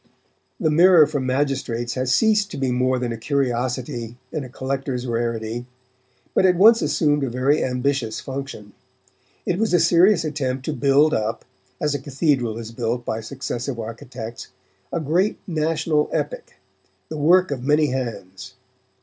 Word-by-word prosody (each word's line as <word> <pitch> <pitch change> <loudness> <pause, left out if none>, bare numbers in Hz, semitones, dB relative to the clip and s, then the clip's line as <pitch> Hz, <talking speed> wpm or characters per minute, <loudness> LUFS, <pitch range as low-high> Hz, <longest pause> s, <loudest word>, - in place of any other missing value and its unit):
The 160 -6 +1
Mirror 170 0 +7
for 145 -1 -3
Magistrates 130 -3 -1
has 130 0 -1
ceased 210 - +3
to - - -7
be 135 -2 0
more 130 +1 +1
than 125 -1 -2
a 115 - -4
curiosity 120 -3 -2 0.2
and 155 - -2
a 130 - -9
collector's 130 -1 -3
rarity, 115 0 -3 0.7
but - - +3
it 185 -1 +5
once 225 +6 +6
assumed 145 -3 +1
a 135 - -1
very 130 +5 +1
ambitious 125 -3 -1
function. 130 -6 -7 0.7
It 180 - -1
was 220 -4 +2
a - - +4
serious 170 +2 +4
attempt 135 -4 -2
to 155 - -2
build 145 +2 +3
up, 110 +1 -2 0.3
as 150 -1 0
a 145 - -2
cathedral 135 -4 0
is 115 -1 -7
built 120 +1 -3
by 110 - -2
successive 125 0 -5
architects, 115 0 -7 0.4
a 170 - -1
great 170 +7 +1
national 155 -2 0
epic, - - -4 0.5
the 155 - -5
work 180 +3 +4
of 135 -3 -3
many 150 0 +2
hands. 115 -8 -5
135 Hz, 155 wpm, -22 LUFS, 120-155 Hz, 0.7 s, Mirror